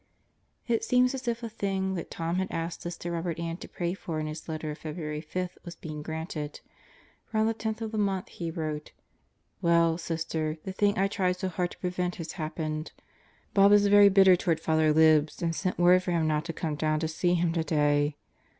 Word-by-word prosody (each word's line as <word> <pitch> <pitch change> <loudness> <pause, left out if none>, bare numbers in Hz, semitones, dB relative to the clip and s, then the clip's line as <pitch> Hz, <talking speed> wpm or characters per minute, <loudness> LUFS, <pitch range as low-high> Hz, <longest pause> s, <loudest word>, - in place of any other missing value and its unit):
It 230 -2 +1
seems 250 +1 +3
as 260 -1 -6
if 235 0 -1
the 235 - -4
thing 195 -3 -2
that 175 - -5
Tom 165 +1 -2
had 190 0 0
asked 165 +1 -3
Sister 175 0 -5
Robert 170 0 -2
Ann 170 0 -3
to - - -9
pray 175 0 -3
for 165 -4 -4
in 155 - -2
his 155 +1 -7
letter 155 -1 -3
of 150 - -8
February 150 -1 -5
5 180 +3 -4
was 175 -1 -8
being 155 -2 -7
granted; 160 -1 -5 0.7
for 220 - -4
on 215 - +3
the 225 - +2
10th 220 0 -4
of 220 -1 -3
the 215 - -2
month 195 -2 0
he 170 -2 -5
wrote 155 -2 -4 0.7
"Well, 170 -1 +3
Sister, 160 -2 -2
the 190 - -5
thing 205 +1 +2
I 195 +1 +3
tried 185 -2 0
so 185 +1 -2
hard 180 0 -1
to - - -12
prevent 180 -1 -2
has 165 -2 -6
happened. 155 -1 -4 0.6
Bob 200 0 +6
is 205 0 +6
very 205 0 +7
bitter 190 -1 +7
toward 175 -3 0
Father 160 -1 +2
Libs 155 -1 +4
and 165 -1 0
sent 185 +1 -2
word 180 +1 +6
for 185 - -5
him 165 -2 +1
not 155 0 0
to 165 - -3
come 160 -1 -3
down 155 +1 0
to 160 - 0
see 175 +3 +1
him 170 -1 +1
today. 145 -3 +1
170 Hz, 215 wpm, -28 LUFS, 155-190 Hz, 0.7 s, very